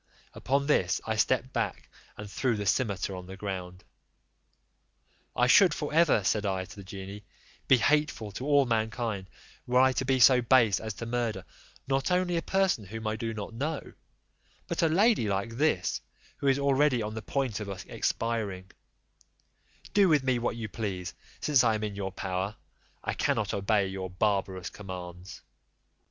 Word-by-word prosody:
Upon 140 +3 0
this 95 -11 +2
I 110 - -1
stepped 130 +4 +1
back, - - -2 0.3
and 105 - -7
threw 120 +2 -1
the 105 - -3
cimeter 100 -3 0
on 90 -1 -8
the 95 +1 -9
ground. 95 -2 -6 1.5
"I 125 - +3
should 180 +9 +6
for 150 -1 -4
ever," 160 -10 +4
said 105 +2 +1
I 95 -2 -1
to - - -13
the 100 - -10
genie, 95 +2 -8 0.4
"be 130 - +6
hateful 145 -5 +1
to 125 +7 -6
all 145 -2 +5
mankind 110 -4 -2 0.4
were 125 +1 +3
I 130 0 +6
to 130 - -1
be 130 0 +1
so 125 0 +7
base 115 -4 +4
as 110 -2 -5
to 115 - -6
murder, 120 -1 -2 0.4
not 135 0 0
only 180 -1 +1
a 165 - +1
person 190 - +1
whom 110 +3 -7
I 110 0 0
do 115 0 -3
not 110 0 -6
know, 145 +5 -4 0.7
but - - -1
a 165 - +4
lady 200 - +3
like 100 +4 -2
this, 145 -11 +1 0.4
who 140 - -2
is 135 -1 +4
already 140 -3 +2
on 105 0 -4
the 110 - -5
point 130 -3 -2
of 105 -2 -5 0.2
expiring: 105 -5 -2 1.2
do 200 -2 +5
with 150 -4 +4
me 130 -2 +1
what 120 -1 -1
you 115 -2 -4
please, 95 -5 -4 0.3
since 145 -5 +4
I 115 -2 +3
am 110 - -3
in 105 -2 -3
your 95 -1 -3
power; 95 +2 -3 0.5
I - - -2
cannot - - 0
obey 100 0 +2
your 95 -1 -5
barbarous 95 -2 -1
commands." 90 -2 -9
110 Hz, 170 wpm, -29 LUFS, 100-130 Hz, 1.5 s, so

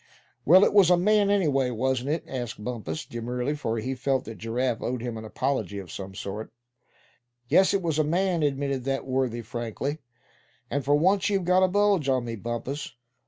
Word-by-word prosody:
"Well, 185 +6 +7
it - - +1
was 200 -4 +6
a 180 - +6
man, 205 +2 +3
anyway, 145 -10 +2
wasn't 130 +2 -1
it?" 155 +2 -1
asked 120 -5 -5
Bumpus, 105 -10 -4
demurely; 125 +4 -3
for 115 -6 -2
he 125 +4 -2
felt 135 +1 -1
that 110 -4 -8
Giraffe 120 +2 -1
owed 125 -1 -3
him 120 -2 -4
an 110 0 -7
apology 110 -4 -2
of 95 -4 -7
some 95 +1 -7
sort. 100 +3 -6 1.0
"Yes, 190 - +5
it 195 -2 0
was 160 -2 0
a - - +4
man," 175 +2 +1
admitted 140 -2 -1
that 135 0 -1
worthy, 130 -3 -1
frankly; 120 +5 -4 0.7
"and 140 0 -1
for 145 +2 +3
once 190 +6 +3
you've 195 -3 0
got 180 +1 +4
a 185 - +5
bulge 200 -6 +2
on 130 -2 +1
me, 115 -1 -4
Bumpus. 120 +5 -5
135 Hz, 190 wpm, -26 LUFS, 120-165 Hz, 1.0 s, Well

